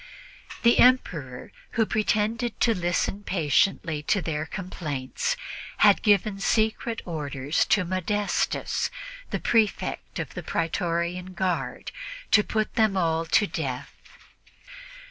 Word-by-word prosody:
The 235 0 +5
Emperor, 165 - +2 0.2
who 225 - +2
pretended 220 +2 0
to 230 - +4
listen 175 +2 -1
patiently 165 -2 +1
to 195 +7 +1
their 155 -2 -3
complaints, 180 - -3 0.4
had - - +5
given 205 -1 +2
secret 220 +2 0
orders 145 -3 -1
to 195 -3 +2
Modestus, 190 +3 -1 0.4
the - - -2
Prefect 220 -3 0
of - - -4
the - - -5
Pretorian 170 +2 -2
Guard, 185 -1 -2 0.4
to 210 - +6
put 215 0 -1
them 220 -4 +2
all 165 -2 +1
to 205 +6 +4
death. - - -4
185 Hz, 110 wpm, -26 LUFS, 165-215 Hz, 0.4 s, to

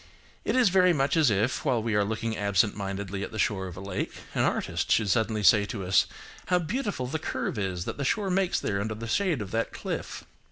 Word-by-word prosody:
It - - 0
is 255 -5 +5
very 180 -1 +5
much 140 -1 +1
as 155 -5 +5
if, 110 +5 0
while 125 -6 +1
we 115 -1 -1
are 105 0 +3
looking 110 +2 -2
absent 100 0 +2
mindedly 100 -1 -4
at - - -5
the 110 - -6
shore 100 -3 0
of 90 -1 -9
a - - -6
lake, 100 -1 -3 0.2
an - - +1
artist - - 0
should 105 -4 +3
suddenly 110 -1 +1
say 105 0 +6
to 100 -2 -5
us–"How 100 - 0
beautiful 185 - -2
the 140 +5 -3
curve 115 - -3
is 95 -3 -2
that - - -4
the - - -1
shore 195 - 0
makes 190 0 +1
there 100 -1 -1
under 110 +1 -3
the 115 +2 -6
shade 155 - 0
of 95 - -10
that 115 0 -1
cliff." - - -5
110 Hz, 230 wpm, -27 LUFS, 100-155 Hz, 0.2 s, say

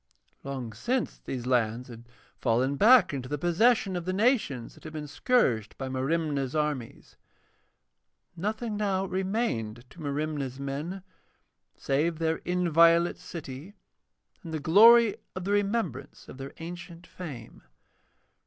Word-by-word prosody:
Long 130 -5 -5
since 245 - -2
these 125 -2 -5
lands 120 -1 0
had 120 -1 -12 0.3
fallen 130 +3 +1
back 215 - +6
into 130 -2 -5
the 145 - -2
possession 190 - +2
of 175 -1 -4
the 185 - -1
nations 200 - +1
that - - -18
had 155 - -9
been 155 -1 -5
scourged 140 - +1
by 135 -1 -4
Merimna's 140 0 -1
armies. 150 -6 -3 1.2
Nothing 215 +5 -3
now 195 -2 0
remained 185 - -2
to 175 - -13
Merimna's 145 -2 -3
men 150 +8 -4 0.7
save 155 +4 0
their 160 0 0
inviolate 170 -1 +3
city 160 +4 -8 0.7
and 165 - -8
the 160 - -2
glory 220 +7 +7 0.2
of 185 - -4
the 200 - -2
remembrance 205 - -1
of 130 - -11
their 135 +1 -7
ancient 175 +1 -9
fame. 140 -13 -9
160 Hz, 130 wpm, -28 LUFS, 135-190 Hz, 1.2 s, glory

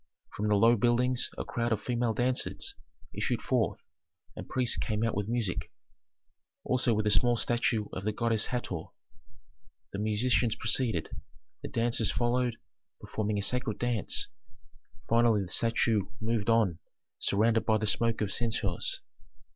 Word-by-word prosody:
From 105 - -1
the 105 - +3
low 115 +3 +5
buildings 120 +3 +2
a - - -3
crowd 120 0 -2
of 110 - +1
female 120 -2 -1
dancers 125 +1 -1 0.4
issued - - -1
forth, - - -1 0.5
and - - -8
priests 125 -2 +1
came 110 0 -1
out 115 - +1
with 100 0 -2
music, 115 -6 -2 0.9
also 125 -2 +1
with 110 0 0
a 105 - +3
small 120 +2 +3
statue 115 -2 +1
of 95 - -4
the 110 - 0
goddess 115 0 +1
Hator. 95 -10 -3 1.1
The 100 - -3
musicians 110 +2 +1
preceded, 110 -11 0 0.5
the - - -5
dancers 115 -1 0
followed, 120 0 +1 0.4
performing 105 -1 -2
a 100 - -1
sacred 120 -1 0
dance; 120 -4 0 0.8
finally 115 -3 +3
the 90 - -7
statue 115 -3 +1
moved 110 0 -1
on 105 -8 +3 0.4
surrounded 110 +3 +2
by 110 -1 +4
the 110 - -2
smoke 115 +2 +1
of 105 -2 +1
censers. 110 -6 -1
115 Hz, 145 wpm, -30 LUFS, 105-120 Hz, 1.1 s, low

